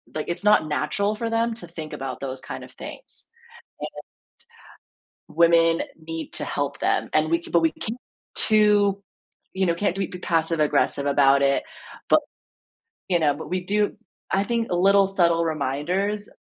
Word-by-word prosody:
like, 155 Hz, -, -2 dB
it's 170 Hz, -, -3 dB
not 210 Hz, -7 st, +4 dB
natural 200 Hz, +8 st, 0 dB
for 230 Hz, +1 st, -3 dB
them 230 Hz, 0 st, +1 dB
to 175 Hz, -6 st, -9 dB
think 160 Hz, -2 st, -8 dB
about 135 Hz, -1 st, -5 dB
those 130 Hz, -1 st, -4 dB
kind -, -, -7 dB
of -, -, -16 dB
things, -, -, -8 dB, 2.0 s
and 155 Hz, -, -16 dB
women 165 Hz, -1 st, +5 dB, 0.3 s
need 165 Hz, -1 st, -5 dB
to -, -, -2 dB
help 140 Hz, -1 st, -3 dB
them -, -, +1 dB
and 155 Hz, 0 st, +2 dB
we 170 Hz, +1 st, +1 dB
c -, -, -11 dB
but 170 Hz, -, +4 dB
we 160 Hz, -, +3 dB
ca 225 Hz, +3 st, -3 dB, 0.4 s
too, 205 Hz, -2 st, +3 dB, 0.5 s
you 190 Hz, -, +1 dB
know, 170 Hz, -, +2 dB
can't 190 Hz, +1 st, -1 dB
do 195 Hz, -, -1 dB
it 190 Hz, -, -3 dB
be 180 Hz, -, -6 dB
passive 165 Hz, -2 st, 0 dB
aggressive 145 Hz, -1 st, +2 dB
about 140 Hz, -1 st, +4 dB
it 140 Hz, 0 st, +2 dB, 0.5 s
bu -, -, +8 dB, 0.9 s
you 175 Hz, -, +4 dB
know, 150 Hz, -3 st, +3 dB
but 160 Hz, -, -8 dB
we 185 Hz, 0 st, -1 dB
do 205 Hz, +2 st, 0 dB, 0.4 s
I 195 Hz, +1 st, +2 dB
think 230 Hz, +1 st, -1 dB
little, 195 Hz, +2 st, +4 dB
subtle 170 Hz, -3 st, +2 dB
reminders, 170 Hz, +8 st, -1 dB
170 Hz, 170 wpm, -24 LUFS, 155-200 Hz, 2.0 s, bu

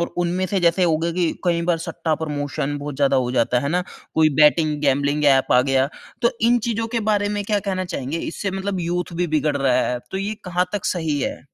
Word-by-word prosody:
और 170 Hz, -, +1 dB
उनमें 175 Hz, +2 st, 0 dB
से 195 Hz, +2 st, 0 dB
जैसे 175 Hz, +2 st, +3 dB
हो 160 Hz, -2 st, +3 dB
गया 170 Hz, +1 st, -1 dB
कि 175 Hz, -2 st, 0 dB
कई 170 Hz, -1 st, +1 dB
बार 170 Hz, -1 st, +1 dB
सट्टा 165 Hz, -1 st, -2 dB
प्रमोशन 145 Hz, -2 st, -3 dB
बहुत 145 Hz, -1 st, -6 dB
ज़्यादा 140 Hz, -1 st, +3 dB
हो 125 Hz, -2 st, +1 dB
जाता 125 Hz, 0 st, +1 dB
है, 125 Hz, -, +1 dB
है 140 Hz, -, -1 dB
ना? 180 Hz, +1 st, +1 dB, 0.3 s
कोई 155 Hz, -1 st, +5 dB
बेटिंग 150 Hz, 0 st, +4 dB
गैंबलिंग 145 Hz, +1 st, +1 dB
ऐप 135 Hz, -2 st, +4 dB
आ 125 Hz, -, +6 dB
गया। 135 Hz, 0 st, +2 dB, 0.3 s
तो 235 Hz, -, +4 dB, 0.2 s
इन 245 Hz, -, +4 dB
चीज़ों 225 Hz, 0 st, -1 dB
के -, -, +1 dB
बारे 205 Hz, -1 st, +1 dB
में 205 Hz, 0 st, -2 dB
क्या 210 Hz, 0 st, +1 dB
कहना 185 Hz, -1 st, -2 dB
चाहेंगे? 155 Hz, -2 st, -4 dB
इससे 195 Hz, +5 st, -4 dB
मतलब 190 Hz, 0 st, -3 dB
यूथ 175 Hz, 0 st, -2 dB
भी 175 Hz, 0 st, 0 dB
बिगड़ 150 Hz, -2 st, 0 dB
रहा 135 Hz, -2 st, +2 dB, 0.2 s
है। 125 Hz, 0 st, -1 dB
तो 190 Hz, -, -3 dB
ये 205 Hz, +2 st, -2 dB
कहाँ 180 Hz, 0 st, 0 dB
तक 205 Hz, -2 st, -3 dB
सही 160 Hz, -5 st, -1 dB
है? -, -, -3 dB
165 Hz, 240 wpm, -22 LUFS, 145-185 Hz, 0.3 s, आ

